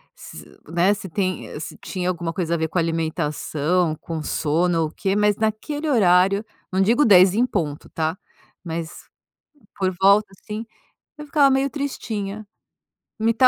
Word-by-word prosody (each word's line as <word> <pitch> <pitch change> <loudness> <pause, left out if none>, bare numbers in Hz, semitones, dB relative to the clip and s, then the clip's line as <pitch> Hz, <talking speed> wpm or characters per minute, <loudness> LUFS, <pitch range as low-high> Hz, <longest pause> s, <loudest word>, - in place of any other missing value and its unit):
se 75 - -11 0.2
né, 175 +4 +3
se 200 -2 -7
tem 185 -2 -3
se 155 - -7
tinha 180 -2 -3
alguma 170 -2 -3
coisa 170 -2 -1
a - - 0
ver 160 0 -1
com 180 - 0
alimentação, 165 0 0
com 160 -1 -5
sono 165 +3 +1
ou 160 - +1
o - - -11
quê, 195 +3 -1
mas 210 0 +3
naquele 290 +8 -2
horário, 195 -4 +4 0.3
não 190 +1 +1
digo 235 +9 +4
10h 185 -4 +7
em 240 +3 +3
ponto, 160 - -3
tá? 160 +2 -2 0.5
Mas 165 -1 -6 0.7
por 190 -2 0
volta, 200 +2 +5
assim, 215 +2 -6 0.5
eu 300 - -8
ficava 285 -1 +4
meio 270 +1 +2
tristinha. 215 -8 -4 0.7
Me 225 +1 +2
185 Hz, 155 wpm, -22 LUFS, 165-215 Hz, 0.7 s, 10h